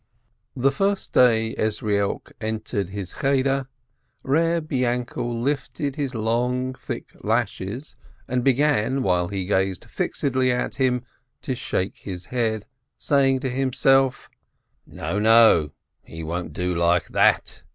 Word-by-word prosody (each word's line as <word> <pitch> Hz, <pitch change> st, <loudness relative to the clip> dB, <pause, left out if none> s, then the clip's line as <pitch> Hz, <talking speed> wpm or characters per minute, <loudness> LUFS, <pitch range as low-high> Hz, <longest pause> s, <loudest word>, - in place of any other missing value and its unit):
The 135 Hz, +1 st, +2 dB
first 195 Hz, +7 st, -1 dB
day 115 Hz, -3 st, +4 dB
Ezrielk 105 Hz, -2 st, -1 dB
entered 110 Hz, -3 st, -3 dB
his 100 Hz, -2 st, -6 dB
Cheder, 135 Hz, -1 st, +1 dB, 0.6 s
Eeb 165 Hz, +3 st, +1 dB
Yainkel 120 Hz, -2 st, -1 dB
lifted 140 Hz, 0 st, -2 dB
his 140 Hz, -4 st, -3 dB
long, 125 Hz, +3 st, 0 dB
thick -, -, -7 dB
lashes, 115 Hz, +3 st, -2 dB, 0.3 s
and 125 Hz, -1 st, -1 dB
began, 135 Hz, -1 st, +2 dB
while 90 Hz, -2 st, +2 dB
he 95 Hz, 0 st, -3 dB
gazed 95 Hz, -1 st, 0 dB
fixedly 130 Hz, -2 st, 0 dB
at 125 Hz, -, -2 dB
him, 125 Hz, -2 st, +1 dB, 0.4 s
to 130 Hz, -, -2 dB
shake 95 Hz, -5 st, -2 dB
his 90 Hz, -3 st, -7 dB
head, 110 Hz, -4 st, 0 dB, 0.3 s
saying 135 Hz, -2 st, +2 dB
to 135 Hz, -, -1 dB
himself: 135 Hz, 0 st, +2 dB, 0.6 s
"No, 105 Hz, -, -3 dB
no, 110 Hz, -8 st, +6 dB, 0.3 s
he 80 Hz, 0 st, -9 dB
won't 85 Hz, +2 st, -4 dB
do 90 Hz, 0 st, -1 dB
like 85 Hz, +1 st, +2 dB
that. -, -, +2 dB
120 Hz, 120 wpm, -23 LUFS, 100-135 Hz, 0.6 s, no